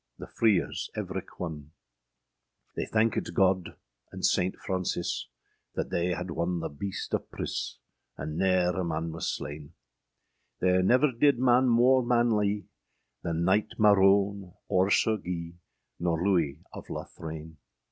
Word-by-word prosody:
The -, -, -8 dB
freers 105 Hz, -7 st, +1 dB
evrich 95 Hz, -2 st, -4 dB
one. 80 Hz, -4 st, -6 dB, 1.0 s
They -, -, -2 dB
thankyd 110 Hz, 0 st, 0 dB
God 95 Hz, -2 st, +2 dB, 0.4 s
and -, -, -8 dB
Saynte 90 Hz, +1 st, +2 dB
Frauncis, 95 Hz, -2 st, -2 dB, 0.5 s
That -, -, -3 dB
they 90 Hz, +1 st, +1 dB
had 90 Hz, +1 st, -5 dB
wonne 85 Hz, +1 st, -1 dB
the 80 Hz, -2 st, -4 dB
beaste 95 Hz, +7 st, -5 dB
of -, -, -1 dB
pris, -, -, -4 dB, 0.4 s
And 75 Hz, -, -5 dB
nere 90 Hz, -1 st, +2 dB
a 95 Hz, -, -1 dB
man 80 Hz, -1 st, -2 dB
was 80 Hz, -, -3 dB
sleyne: 75 Hz, +1 st, -7 dB, 0.9 s
There 90 Hz, 0 st, +3 dB
never 130 Hz, +9 st, +4 dB
didde 140 Hz, +4 st, +3 dB
man 125 Hz, +1 st, +4 dB
more 125 Hz, +2 st, +5 dB
manlye, 110 Hz, -4 st, +2 dB, 0.6 s
The -, -, -3 dB
Knyght 95 Hz, +6 st, +1 dB
Marone, 100 Hz, -2 st, +4 dB
or 95 Hz, +1 st, +2 dB
Sir 110 Hz, +1 st, +3 dB
Guye, 85 Hz, -2 st, -6 dB, 0.4 s
Nor 85 Hz, -2 st, 0 dB
Louis 85 Hz, -5 st, +1 dB
of -, -, -9 dB
Lothraine. 80 Hz, 0 st, -7 dB
95 Hz, 135 wpm, -28 LUFS, 85-105 Hz, 1.0 s, more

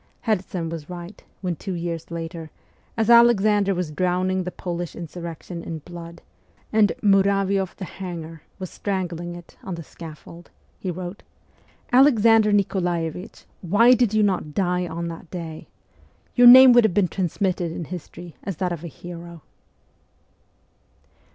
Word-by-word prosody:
Herzen 185 Hz, -6 st, -2 dB
was 160 Hz, -1 st, -7 dB
right 175 Hz, +2 st, -9 dB, 0.2 s
when, 180 Hz, -3 st, -2 dB
two 190 Hz, +4 st, -6 dB
years 170 Hz, -1 st, -4 dB
later, 165 Hz, -1 st, -6 dB, 0.5 s
as 225 Hz, -, +1 dB
Alexander 215 Hz, -4 st, +5 dB
was 175 Hz, -3 st, -3 dB
drowning 185 Hz, +3 st, 0 dB
the 180 Hz, -, -4 dB
Polish 175 Hz, -2 st, -5 dB
insurrection 170 Hz, 0 st, -7 dB
in 165 Hz, -, -5 dB
blood, 170 Hz, +1 st, -11 dB, 0.5 s
and 215 Hz, -2 st, +4 dB
' -, -, -40 dB
Muravioff 195 Hz, -1 st, +2 dB
the 190 Hz, -, -6 dB
Hanger 165 Hz, -4 st, -8 dB
' -, -, -38 dB
was 185 Hz, -2 st, -7 dB
strangling 175 Hz, -3 st, -4 dB
it 175 Hz, -1 st, -13 dB
on 185 Hz, -, -5 dB
the 165 Hz, -, -8 dB
scaffold, 165 Hz, +2 st, -12 dB, 0.3 s
he 190 Hz, -, -4 dB
wrote, 180 Hz, +2 st, -6 dB, 0.4 s
' -, -, -30 dB
Alexander 225 Hz, -5 st, +5 dB
Nikolaevich, 180 Hz, -4 st, -1 dB, 0.2 s
why 210 Hz, +8 st, +5 dB
did 240 Hz, -4 st, +2 dB
you 215 Hz, -1 st, +2 dB
not 180 Hz, -7 st, -1 dB
die 180 Hz, -2 st, 0 dB
on 170 Hz, +1 st, -4 dB
that 165 Hz, 0 st, -9 dB
day? 165 Hz, -3 st, -7 dB, 0.7 s
Your 245 Hz, -1 st, +7 dB
name 255 Hz, +1 st, +10 dB
would 240 Hz, 0 st, +6 dB
have 210 Hz, -5 st, +1 dB
been 200 Hz, -3 st, +3 dB
transmitted 180 Hz, -1 st, -1 dB
in 165 Hz, -, -5 dB
history 175 Hz, 0 st, -9 dB
as 195 Hz, -5 st, -5 dB
that 180 Hz, -1 st, -1 dB
of 170 Hz, -1 st, -5 dB
a -, -, -5 dB
hero.' 170 Hz, 0 st, -10 dB
180 Hz, 150 wpm, -23 LUFS, 170-200 Hz, 0.7 s, name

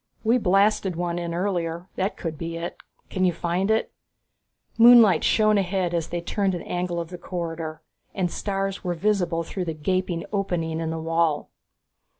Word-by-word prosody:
"We 235 Hz, +3 st, +3 dB
blasted 195 Hz, -2 st, +2 dB
one 175 Hz, 0 st, -2 dB
in 170 Hz, -1 st, -4 dB
earlier 175 Hz, -1 st, -2 dB
that 190 Hz, +3 st, -1 dB
could 165 Hz, -2 st, -4 dB
be 165 Hz, +2 st, -5 dB
it. 170 Hz, +1 st, -5 dB, 0.4 s
Can 185 Hz, -, 0 dB
you 180 Hz, -, +4 dB
find 175 Hz, +3 st, -1 dB
it?" 220 Hz, +1 st, +1 dB, 0.9 s
Moonlight 230 Hz, -7 st, +8 dB
shone 215 Hz, -1 st, +4 dB
ahead 185 Hz, -2 st, -1 dB
as 165 Hz, -2 st, -1 dB
they 175 Hz, 0 st, -3 dB
turned 195 Hz, +1 st, 0 dB
an 175 Hz, -, -5 dB
angle 175 Hz, -1 st, -2 dB
of 165 Hz, -1 st, -5 dB
the 180 Hz, -, -7 dB
corridor, 165 Hz, -3 st, -5 dB, 0.3 s
and 180 Hz, -3 st, 0 dB
stars 195 Hz, -1 st, -3 dB
were 175 Hz, -2 st, -1 dB
visible 180 Hz, -3 st, 0 dB
through 180 Hz, +2 st, -4 dB
the 165 Hz, -2 st, -3 dB
gaping 180 Hz, +2 st, -1 dB
opening 170 Hz, -5 st, -1 dB
in 165 Hz, -1 st, -2 dB
the 160 Hz, -, -3 dB
wall. 165 Hz, -1 st, 0 dB
175 Hz, 170 wpm, -25 LUFS, 165-195 Hz, 0.9 s, Moonlight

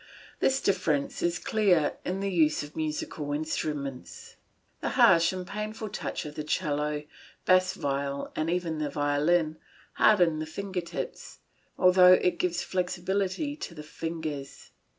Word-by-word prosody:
This 270 Hz, 0 st, +2 dB
difference 155 Hz, -7 st, 0 dB
is 175 Hz, 0 st, +1 dB
clear 180 Hz, -5 st, +2 dB
in 185 Hz, +2 st, -2 dB
the 200 Hz, 0 st, -1 dB
use 155 Hz, -5 st, +2 dB
of 145 Hz, +1 st, -11 dB
musical 155 Hz, -1 st, -3 dB
instruments. 145 Hz, -3 st, -4 dB, 0.4 s
The -, -, -2 dB
harsh 165 Hz, 0 st, +6 dB
and 185 Hz, -1 st, -5 dB
painful 210 Hz, +2 st, -5 dB
touch 210 Hz, -, -4 dB
of 150 Hz, -, -7 dB
the 150 Hz, -, -5 dB
'cello, 150 Hz, -2 st, -1 dB, 0.4 s
bass 185 Hz, 0 st, +4 dB
viol, 140 Hz, -3 st, -2 dB
and 155 Hz, +1 st, -1 dB
even 170 Hz, -2 st, -1 dB
of -, -, -5 dB
the 150 Hz, -1 st, -1 dB
violin, 155 Hz, +3 st, +1 dB, 0.4 s
hardens 175 Hz, -7 st, +4 dB
the 155 Hz, -, -4 dB
finger 190 Hz, +2 st, -4 dB
tips, 170 Hz, -, -6 dB, 0.4 s
although 180 Hz, 0 st, +7 dB
it 180 Hz, -1 st, +2 dB
gives 175 Hz, -1 st, 0 dB
flexibility 190 Hz, -, -1 dB
to 170 Hz, -, -7 dB
the 150 Hz, -, -8 dB
fingers. 155 Hz, -3 st, -6 dB
165 Hz, 145 wpm, -28 LUFS, 150-185 Hz, 0.4 s, although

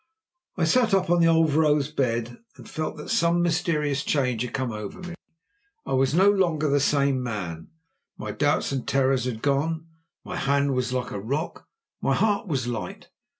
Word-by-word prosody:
_" -, -, -7 dB
I 165 Hz, -, +3 dB
sat 220 Hz, +4 st, +3 dB
up 185 Hz, -2 st, +1 dB
on 175 Hz, 0 st, +4 dB
the 165 Hz, -, +5 dB
old 165 Hz, -1 st, +4 dB
vrouw's 150 Hz, -1 st, +2 dB
bed, 120 Hz, -4 st, -2 dB, 0.2 s
and -, -, -13 dB
felt 155 Hz, 0 st, -4 dB
that 150 Hz, -, -8 dB
some 175 Hz, -6 st, +2 dB
mysterious 155 Hz, -4 st, 0 dB
change 125 Hz, -6 st, 0 dB
had 125 Hz, -1 st, -3 dB
come 130 Hz, -2 st, -2 dB
over 105 Hz, -, -7 dB
me. 180 Hz, -1 st, -7 dB, 0.7 s
I -, -, -3 dB
was 135 Hz, +2 st, +2 dB
no 190 Hz, +3 st, +5 dB
longer 175 Hz, -7 st, +2 dB
the 145 Hz, 0 st, +2 dB
same 140 Hz, -1 st, +2 dB
man. 90 Hz, -9 st, -5 dB, 0.5 s
My -, -, -5 dB
doubts 145 Hz, 0 st, 0 dB
and 135 Hz, -3 st, -3 dB
terrors 135 Hz, -2 st, +2 dB
had 115 Hz, -3 st, -4 dB
gone; 155 Hz, +4 st, 0 dB, 0.4 s
my 180 Hz, -, -6 dB
hand 140 Hz, -1 st, +1 dB
was 125 Hz, -1 st, -1 dB
like 125 Hz, -1 st, -2 dB
a 100 Hz, -, -4 dB
rock; 140 Hz, -, -4 dB, 0.3 s
my -, -, +1 dB
heart 210 Hz, 0 st, +1 dB
was 135 Hz, -7 st, -1 dB
light. 120 Hz, -3 st, -5 dB
140 Hz, 190 wpm, -25 LUFS, 125-165 Hz, 0.7 s, the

